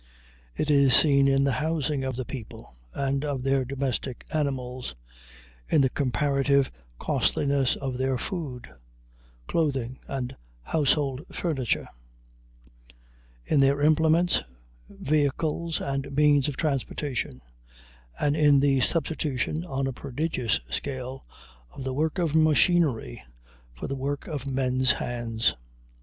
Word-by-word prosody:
It 150 - 0
is 140 -4 +5
seen 140 -3 +5
in 135 0 +3
the 140 - +2
housing 150 -3 -1
of 130 -1 -2
the 130 0 -4
people 115 - -9 0.2
and 140 0 -1
of 140 -4 -2
their 135 0 +2
domestic 130 -1 -3
animals, 130 - -2 0.7
in 150 - +4
the 130 -2 +2
comparative 140 0 +1 0.3
costliness 140 - +1
of 130 -2 -4
their 130 0 +1
food, 140 -5 -5 0.8
clothing, 135 - -1
and 130 -2 -4 0.3
household 140 - +1
furniture, 140 -9 -1 1.6
in 150 - +2
their 135 +1 +4
implements, 160 +3 +3 0.5
vehicles, 155 +3 0
and 135 0 -3
means 145 -1 +4
of 140 -3 -4
transportation, 135 - -2 0.8
and 145 0 +2
in 145 -2 +5
the 135 -1 +3
substitution, 155 0 0
on 135 -5 -2
a 135 - -2
prodigious 130 -2 -1
scale, 130 -1 -4 0.4
of 130 - -9
the 130 0 -2
work 155 +5 0
of 170 -4 0
machinery 155 - +3 0.5
for - - -8
the 135 - -3
work 140 +2 -3
of 140 -3 -5
men's 130 -1 +2
hands. 115 -2 -1
140 Hz, 120 wpm, -26 LUFS, 130-150 Hz, 1.6 s, is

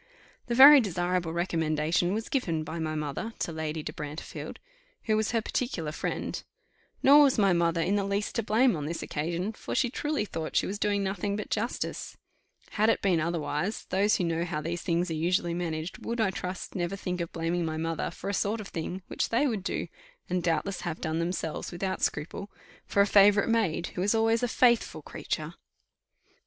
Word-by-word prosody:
The 240 - -1
very 275 +2 +10
desirable 180 -3 -1
recommendation 165 +1 0
was 220 +1 -3
given 170 - -1
by 160 +2 -5
my 155 -1 -2
mother 150 +9 -3
to - - -2
Lady 160 -1 -3
de - - -5
Brantefield, 150 +1 -7 0.5
who 215 - +1
was 215 0 +1
her 230 -2 0
particular 190 - -2
friend; - - -3 0.6
nor 285 +2 +8
was 275 -3 +4
my 200 -3 +4
mother 170 -1 +2
in 195 +5 +1
the 200 - +1
least 200 +1 -1
to 230 - 0
blame 230 +2 +3
on 150 -2 -4
this 165 +1 -4
occasion, 170 +7 -2
for - - -6
she 245 -3 +2
truly 295 -5 -1
thought 160 -5 -5
she - - +3
was 205 +2 -4
doing 205 -1 +1
nothing 200 +1 -2
but 210 - -5
justice; 230 +3 -3 0.5
had 215 +1 +2
it - - +1
been 185 -4 +3
otherwise, 170 +3 -2
those 200 +3 +3
who - - 0
know 165 0 0
how 170 -3 -3
these 170 +3 -3
things 170 0 0
are - - 0
usually 170 +2 +1
managed, 165 -1 -4
would, 235 +1 -3
I 215 -4 +2
trust, 180 0 -5
never 175 +1 -2
think 180 -2 -3
of 170 - -4
blaming 170 +1 -1
my 160 -1 -2
mother 165 0 -2
for 170 - -8
a 200 - -1
sort 205 +3 0
of 205 - -7
thing 175 +3 -5
which - - -2
they 235 +6 +2
would 220 -8 -1
do, - - -2 0.4
and 180 0 0
doubtless 175 +3 -1
have 170 -2 -4
done 160 0 -2
themselves 170 -2 -3
without 185 +2 -3
scruple, 170 +7 -2 0.4
for 200 - +3
a - - +6
favourite 200 +1 +5
maid, 195 -7 +1
who 180 - -3
is 205 +4 +2
always 225 +1 +3
a 245 - +1
faithful 240 0 +2
creature. - - -4
180 Hz, 200 wpm, -28 LUFS, 165-210 Hz, 0.6 s, very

